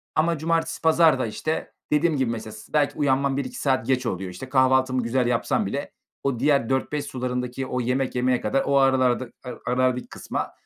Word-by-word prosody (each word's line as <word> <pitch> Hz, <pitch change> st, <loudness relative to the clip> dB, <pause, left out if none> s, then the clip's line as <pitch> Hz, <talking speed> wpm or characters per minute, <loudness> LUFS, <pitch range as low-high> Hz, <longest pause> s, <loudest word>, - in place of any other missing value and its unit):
ama 165 Hz, +1 st, +2 dB
cumartesi, 165 Hz, +1 st, -1 dB
pazar 160 Hz, -3 st, +5 dB
da, 130 Hz, -, 0 dB
işte, 155 Hz, +8 st, -3 dB, 0.2 s
dediğim 150 Hz, +1 st, +2 dB
gibi 130 Hz, -3 st, +1 dB
mesela 110 Hz, -1 st, -5 dB
s 110 Hz, -, -13 dB
belki 150 Hz, -2 st, +2 dB
uyanmam 140 Hz, -1 st, +1 dB
1-2 135 Hz, -2 st, -4 dB
saat 130 Hz, -3 st, +1 dB
geç 130 Hz, -1 st, +1 dB
oluyor. 95 Hz, -3 st, -3 dB
İşte, 125 Hz, +9 st, -9 dB
kahvaltımı 130 Hz, -1 st, +3 dB
güzel 120 Hz, +1 st, +1 dB
yapsam 120 Hz, -1 st, +1 dB
bile, -, -, -4 dB, 0.3 s
o 135 Hz, -4 st, -1 dB
diğer 140 Hz, -3 st, +2 dB
16:00-17:00 140 Hz, +2 st, -1 dB
sularındaki, 125 Hz, -1 st, -3 dB
o 125 Hz, -1 st, -2 dB
yemek 125 Hz, +2 st, -1 dB
yemeye 125 Hz, 0 st, +1 dB
kadar, 135 Hz, +6 st, +1 dB
o 140 Hz, -, +2 dB
aralarda 130 Hz, -2 st, +3 dB, 0.2 s
ara 125 Hz, -2 st, -7 dB
arardaki 125 Hz, 0 st, +1 dB
kısma, -, -, -4 dB
130 Hz, 185 wpm, -24 LUFS, 125-140 Hz, 0.3 s, pazar